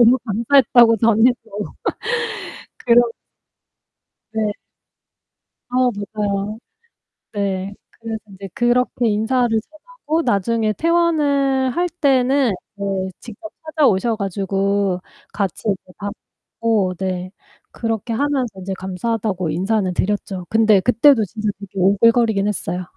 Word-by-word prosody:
"너무 240 +2 +6
감사했다고 235 +1 +4
전해 230 +2 +4
줘." 220 - -21 1.3
그런 240 -1 +5 1.2
네. 215 -1 0 1.2
어 250 0 +2
맞아요. 205 0 -3 0.7
네. 200 -1 -2 0.2
그래서 225 -1 -6 0.2
이제 195 0 -9
그렇게 240 0 +1
인사를 225 +4 +1
전하고 320 - -4
나중에 220 0 +1
퇴원을 290 - +2
할 350 +1 +1
때는 275 -5 +2 0.2
네, 195 -2 -2
직접 240 +8 -10 0.2
찾아오셔 240 -8 +2
가지고 195 -1 -1 0.3
같이 195 -4 -3
이렇게 185 -2 -3
밥 205 0 -4 0.5
먹고 215 -5 +2
네 185 0 -3 0.4
그렇게 225 0 -3
하면서 255 -6 -1
이제 190 +1 -4
감사하다고 190 -1 -2
인사는 190 +3 0
드렸죠. 190 -1 -2
근데 220 -2 +4
그때도 245 +1 +5
진짜 210 +3 -3
되게 200 -2 -10
오글거리긴 205 +2 +3
했어요. 180 -3 -3
220 Hz, 250 characters per minute, -20 LUFS, 195-250 Hz, 1.3 s, 너무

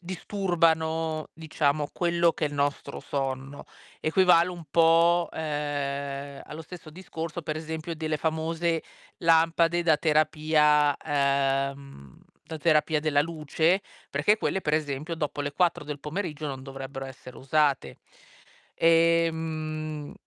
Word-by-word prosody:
disturbano, 165 -4 0
diciamo, 150 -2 -1
quello 170 -1 +2
che 155 - -1
è - - -2
il 145 - -8
nostro 140 0 -2
sonno. 135 0 -4 0.4
Equivale 175 +1 +4
un 175 -2 -8
po', 170 +1 +4
uhm, 140 -2 -4
allo 160 +2 -9
stesso 170 0 -11
discorso, 165 0 -6
per 155 0 -3
esempio, 160 +1 -5
delle 155 -1 -2
famose 160 +2 -1 0.4
lampade 165 +1 +3
da 160 -3 +3
terapia 150 -1 +3
uhm, 140 - -1 0.2
da 160 - -7
terapia 155 0 +2
della 150 -2 +2
luce, 160 +3 0 0.3
perché 160 +10 +2
quelle 190 - -1
per 150 - -1
esempio 155 +1 -1
dopo 150 -2 -3
le 145 0 -3
4 175 -1 +1
del 145 -1 -6
pomeriggio 155 -1 -4
non 135 -2 -5
dovrebbero 135 0 -7
essere 130 -1 -11
usate. 145 0 0 0.8
Ehm 160 -2 +1
155 Hz, 120 wpm, -27 LUFS, 145-165 Hz, 0.8 s, Equivale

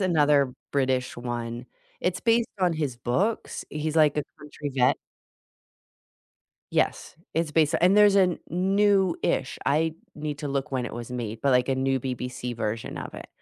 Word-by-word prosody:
another 150 -7 +3 0.2
British 130 -3 0
one, 120 0 -4 0.3
it's 180 0 -1
based 230 0 +3
on 180 -2 +3
his 145 -6 -2
books, 175 - -1
he's, 155 +1 -3
like, 150 -2 +5
a - - +1 0.2
country 150 -1 -7
vet. 125 -1 +3 1.8
Yes, - - 0 0.2
it's 165 -2 -1
based 160 0 +3
and 185 +4 +5
there's 205 -1 +6
a 185 -3 +4
newish 195 +1 +1
I 160 +2 +2 0.2
need 150 -1 -4
to 145 - -4
look 135 -1 -2
when 130 -2 0
it - - -6
was 120 +1 -7
made, 115 -3 -4
but, 140 - +2
like, 125 +1 +3
a 135 - +2
new 135 0 +1
BBC 125 -1 -4
version 110 0 -3
of - - -7
it. - - -9
145 Hz, 160 wpm, -26 LUFS, 125-170 Hz, 1.8 s, there's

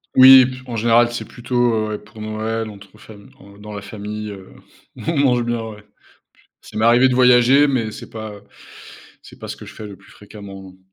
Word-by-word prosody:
Oui, 130 0 +9
p 130 0 -6
en 120 - -6
général, 120 +1 +3
c'est 120 - -5
plutôt, 120 -1 -1
heu, 110 -1 -1
ouais, 105 - -4
pour 110 0 -15
Noël, 110 +1 -4
entre 100 +1 -15
fam 100 -2 -15 0.3
dans 105 0 -10
la 100 - -7
famille, 105 +1 -7
heu, 95 -2 -10 0.5
on 165 -2 -4
mange 125 -3 +2
bien, 120 0 -2
ouais. 105 -1 -12
P 105 - -29 0.8
ça - - -13
m'est 110 - 0
arrivé 120 +3 +5
de 125 - 0
voyager, 125 +3 +5
mais 115 -5 -1
c'est - - -11
pas 110 -2 -8 0.8
c'est - - -16
pas - - -9
ce - - -6
que - - -12
je - - -12
fais 105 - -9
le 100 -2 -11
plus 100 - -21
fréquemment, 100 -1 -12
non. 95 0 -15
110 Hz, 215 wpm, -19 LUFS, 105-120 Hz, 0.8 s, Oui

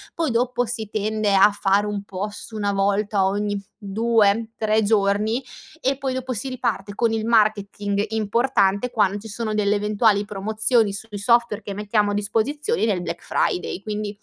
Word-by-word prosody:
Poi 325 -5 0
dopo 245 +1 +1
si 220 -2 -4
tende 215 -1 0
a 195 +2 +6
fare 200 0 +1
un 205 -1 -3
post 205 +3 -6
una 205 -2 -1
volta 200 0 +1
ogni 205 +1 -1 0.2
2,3 220 +1 +1
giorni, 210 +3 +1 0.4
e 270 +1 0
poi, 270 -2 -2
dopo 260 0 -4
si 250 +2 -3
riparte 230 -6 -3
con 230 +1 +1
il 220 -1 -1
marketing 205 -2 +1
importante, 220 0 +1
quand 205 -2 +1
ci 220 - -10
sono 215 +1 -4
delle 210 -1 +1
eventuali 210 0 +2
promozioni 215 +2 +1
sui 210 +1 -6
software 235 0 +2
che 200 - -5
mettiamo 210 0 0
a - - -2
disposizione 230 - 0
nel 200 -5 0
Black 170 -1 -5
Friday. 180 +1 -1
Quindi, 210 -1 -4
210 Hz, 160 wpm, -22 LUFS, 200-230 Hz, 0.4 s, a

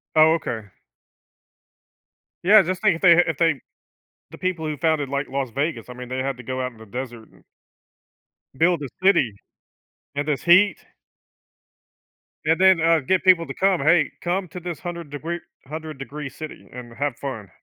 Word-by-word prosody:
Oh, 155 +1 +6
okay. 110 -10 -5 1.8
Yeah, 210 +4 +8
just 185 +1 -3
think 210 -6 +4
if - - -18
they 170 -3 +7
ha 175 - +6
if 160 -3 -2
they 165 -6 +2 0.7
the - - -11
people 180 -4 -2
who 150 -2 -3
founded, 155 -4 0
like, 140 0 -2
Las 135 -2 -3
Vegas, 135 -2 -3
I - - -6
mean, 125 0 -9
they 130 0 -3
had 135 -1 -3
to 125 - -9
go 130 +1 -3
out 125 - -3
in 115 - -19
the 110 - -13
desert 120 0 -7
and - - -23 1.1
build 165 0 +2
a - - -3 0.2
city. 135 - +4 0.8
In 145 - -1
this 150 -2 -1
heat? 180 +1 +5 1.7
And 160 +3 +2
then, 190 -3 +5
uh, 165 -1 +4
get 180 +7 0
people 180 -3 +5
to 135 - -5
come. 190 +1 +2
"Hey, 155 +2 +3
come 180 0 -2
to 180 - -7
this 175 -2 -5
100 170 -4 -6
degree 165 +4 -4 0.3
100 155 +1 -7
degree 140 +1 -7
city 155 +3 -9
and 120 -2 -9
have 140 -3 -2
fun." 115 -8 -6
155 Hz, 180 wpm, -23 LUFS, 130-170 Hz, 1.8 s, Yeah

